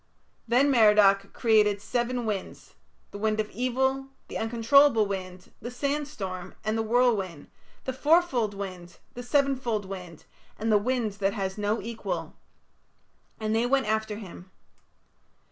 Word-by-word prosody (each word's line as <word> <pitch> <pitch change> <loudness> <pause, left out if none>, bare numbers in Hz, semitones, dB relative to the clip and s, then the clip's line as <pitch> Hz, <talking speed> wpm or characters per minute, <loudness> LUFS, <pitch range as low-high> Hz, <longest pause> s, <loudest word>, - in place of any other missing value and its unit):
Then 260 +5 +3
Merodach 210 -4 +5
created 210 -3 +3
seven 240 +3 -2
winds 205 -3 -5 0.4
the 205 - -8
wind 215 0 0
of 215 -1 -2
evil, 265 +4 0 0.2
the - - -4
uncontrollable 230 +1 +4
wind, 185 -2 -6
the 240 - -5
sandstorm, 250 -9 -4
and 215 0 -1
the 225 - 0
whirlwind, 220 - 0 0.3
the 260 - -3
fourfold 265 - +2
wind, 185 -3 -7 0.2
the 245 - -7
sevenfold 250 -5 0
wind, 180 -4 -9 0.3
and 225 +1 -1
the 210 - +5
wind 240 0 -1
that 195 0 +1
has 190 -2 -3
no 210 +1 -1
equal 230 0 -5 1.1
and 215 0 -1
they 230 +2 +2
went 270 +1 +2
after 220 0 -1
him. 190 -3 -10
220 Hz, 135 wpm, -27 LUFS, 200-250 Hz, 1.1 s, Merodach